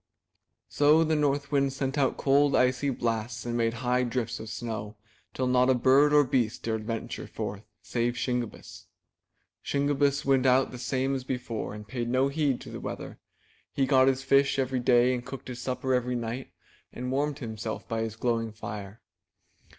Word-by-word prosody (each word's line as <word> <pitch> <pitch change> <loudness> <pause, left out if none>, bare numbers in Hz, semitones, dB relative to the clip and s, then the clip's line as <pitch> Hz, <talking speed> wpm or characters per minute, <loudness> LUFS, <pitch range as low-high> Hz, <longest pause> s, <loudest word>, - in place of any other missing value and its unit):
So 150 +3 +4
the 160 0 +1
North 145 -2 0
Wind 140 -2 +2
sent 135 0 -2
out 140 -3 +1
cold, 140 +1 +3
icy 130 +2 +2
blasts, 115 -2 -2
and 120 0 -2
made 115 -1 +1
high 125 +1 +2
drifts 125 -1 -2
of 110 - -7
snow, 110 -2 -5 0.4
till 130 - -2
not 125 0 +3
a 130 - +5
bird 135 +4 +5
or 150 0 +6
beast 125 -4 0
dared 110 -2 -2
venture 115 -1 -4
forth 100 0 -5 0.2
— - - -52
save 120 0 +1
Shingebiss. 125 -2 -4 0.8
Shingebiss 140 0 +1
went 135 -1 +3
out 130 +1 +4
the 125 - -8
same 130 +1 -1
as 130 -2 -2
before 125 -5 -4
and 105 0 -10
paid 120 -1 -3
no 130 +2 +2
heed 140 -3 0
to - - -9
the - - -6
weather. - - -7 0.5
He 135 - +1
got 130 -1 +4
his 135 0 +1
fish 140 +1 +3
every 130 -1 0
day 125 +1 +4
and 125 -1 -3
cooked 130 +1 -8
his 125 -1 -6
supper 130 0 -1
every 125 0 0
night 120 +2 -4 0.4
and 125 +1 -5
warmed 145 +2 0
himself 110 -2 -5
by 115 0 -2
his 110 -1 -3
glowing 115 -1 -1
fire. 105 -1 -8
125 Hz, 180 wpm, -28 LUFS, 115-135 Hz, 0.8 s, or